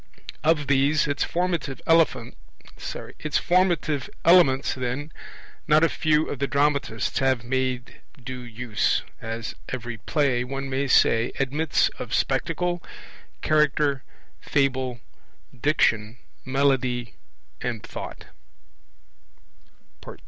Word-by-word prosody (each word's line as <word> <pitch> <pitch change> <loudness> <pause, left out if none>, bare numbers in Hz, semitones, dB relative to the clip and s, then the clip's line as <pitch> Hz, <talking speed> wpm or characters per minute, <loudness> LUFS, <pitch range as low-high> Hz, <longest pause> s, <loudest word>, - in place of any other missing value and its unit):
Of 155 -2 +3
these, 140 +2 +3
its 145 -1 0
formative 170 -7 -2
elements, 145 -8 +3 2.4
then, 130 +4 -4 0.6
not 155 +1 +5
a 165 - +5
few 155 0 +1
of 140 - -5
the 140 - 0
dramatists 140 -5 0
have 130 -3 +1
made 130 0 -2 0.2
due 130 +1 -6
use, 120 -3 -1 0.2
as 115 0 -5 0.2
every 120 -2 -5
play, 135 -6 +1
one 135 +1 -5
may 135 +1 0
say, 115 -2 +4
admits 140 +3 +1
of - - -3
Spectacle, 175 -1 0 0.6
Character, 150 -2 +2 0.4
Fable, 130 -4 0 0.5
Diction, 115 -4 +1 0.3
Melody, 130 -4 0 0.5
and 120 -3 -3
Thought. - - -8
135 Hz, 90 wpm, -25 LUFS, 125-150 Hz, 2.4 s, not